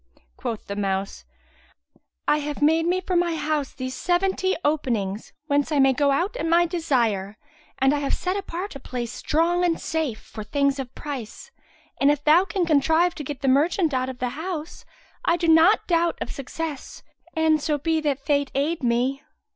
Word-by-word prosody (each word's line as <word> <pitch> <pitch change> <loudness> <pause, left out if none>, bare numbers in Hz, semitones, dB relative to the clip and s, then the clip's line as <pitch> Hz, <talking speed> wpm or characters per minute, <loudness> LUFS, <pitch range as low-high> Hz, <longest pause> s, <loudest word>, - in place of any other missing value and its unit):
Quoth 230 -4 -5
the 200 - -5
mouse, 195 -1 -2 1.0
"I 300 - +3
have 295 -1 -4
made 320 +3 +3
me 365 +1 +1
for 370 0 -2
my 345 -1 +2
house 300 -2 -1
these 255 0 -5
seventy 375 +4 +1
openings, 230 -9 -1
whence 290 0 +1
I 300 - +1
may 270 -1 +5
go 285 +2 +2
out 345 - 0
at 415 - -2
my 340 +1 +4
desire, 235 - 0 0.4
and 270 +1 +3
I 295 - 0
have 280 -1 0
set 365 +1 -2
apart 390 -2 -5
a - - -6
place 240 -3 -5
strong 340 +6 +1
and 340 -2 +1
safe, 310 -9 -2
for 215 - -9
things 280 +4 0
of 260 -1 -6
price; 265 -7 -7 0.5
and 275 - +4
if 290 0 +1
thou 320 +5 +5
can 380 -2 -1
contrive 320 +3 +3
to 300 - -7
get 280 -1 -6
the 275 - -1
merchant 310 +4 +2
out 255 0 0
of 260 - -7
the 250 0 -2
house, 320 +4 -6 0.4
I 340 - +2
doubt 335 +4 +5
not 340 -1 +2
of - - -4
success, 290 +1 -6 0.3
an 320 -1 +3
so 300 0 0
be 320 +2 0
that 280 -2 -2
Fate 285 -1 +1
aid 300 +4 0
me." 250 +3 0
295 Hz, 185 wpm, -24 LUFS, 265-335 Hz, 1.0 s, may